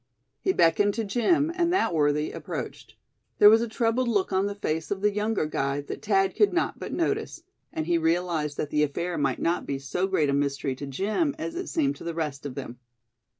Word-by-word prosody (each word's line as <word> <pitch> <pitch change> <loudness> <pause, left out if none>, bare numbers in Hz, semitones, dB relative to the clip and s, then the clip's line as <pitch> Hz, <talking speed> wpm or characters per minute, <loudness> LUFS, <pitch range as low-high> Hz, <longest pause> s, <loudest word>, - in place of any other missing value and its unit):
He 380 - +1
beckoned 200 - +3
to 225 - -1
Jim, 255 - +2
and 345 -1 +1
that 370 - +1
worthy 150 -1 +1
approached. - - -7 0.4
There 210 0 +9
was 225 +1 +5
a 235 - -1
troubled 230 +3 0
look 200 -4 0
on 190 +1 +2
the 205 - -4
face 160 -5 -2
of 195 -1 -2
the 210 0 +2
younger 210 -3 0
guide 140 -1 -2
that - - -6
Thad 195 -2 +2
could 420 - +4
not 355 - 0
but - - -6
notice; 385 0 -2 0.3
and 155 - -3
he 170 0 +2
realized 165 -3 0
that 150 - -3
the 150 - +2
affair 170 +4 -1
might 135 -3 +1
not 170 +1 -1
be 140 - -2
so 160 +8 -2
great 160 -7 +1
a - - 0
mystery 140 -1 0
to 140 - -6
Jim 215 - -1
as 320 - -4
it 365 +2 -5
seemed 285 -4 0
to - - -11
the 170 -1 -4
rest 145 -4 -3
of 130 - -8
them. 125 -3 -7
185 Hz, 220 wpm, -26 LUFS, 150-225 Hz, 0.4 s, There